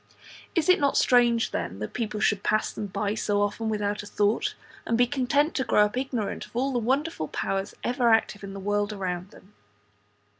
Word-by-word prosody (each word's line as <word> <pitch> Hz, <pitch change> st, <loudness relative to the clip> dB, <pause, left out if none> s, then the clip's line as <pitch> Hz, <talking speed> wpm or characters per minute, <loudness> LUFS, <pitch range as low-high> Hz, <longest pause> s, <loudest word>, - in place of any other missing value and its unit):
Is 330 Hz, -3 st, +1 dB
it 365 Hz, 0 st, +5 dB
not 280 Hz, -1 st, +2 dB
strange, 240 Hz, -2 st, +4 dB
then, -, -, -3 dB
that -, -, -6 dB
people 215 Hz, -3 st, -3 dB
should 205 Hz, -1 st, +2 dB
pass 215 Hz, +1 st, 0 dB
them 210 Hz, -, -4 dB
by 200 Hz, +1 st, -2 dB
so 205 Hz, -1 st, 0 dB
often 205 Hz, +2 st, -1 dB
without 210 Hz, -1 st, -1 dB
a 205 Hz, -, -10 dB
thought, 205 Hz, +2 st, 0 dB, 0.3 s
and 230 Hz, -, 0 dB
be 245 Hz, -, +5 dB
content 285 Hz, +4 st, +1 dB
to 265 Hz, -, +1 dB
grow 210 Hz, -4 st, +4 dB
up 210 Hz, -, -4 dB
ignorant 250 Hz, -5 st, -3 dB
of -, -, -25 dB
all 265 Hz, +3 st, 0 dB
the 245 Hz, -, +1 dB
wonderful 265 Hz, -, -1 dB
powers 195 Hz, +5 st, -3 dB
ever 245 Hz, -1 st, +2 dB
active 220 Hz, -2 st, +2 dB
in 195 Hz, 0 st, -7 dB
the 195 Hz, -, -6 dB
world 205 Hz, +1 st, 0 dB
around 185 Hz, -2 st, -4 dB
them? 200 Hz, +1 st, -18 dB
215 Hz, 200 wpm, -26 LUFS, 205-245 Hz, 0.3 s, it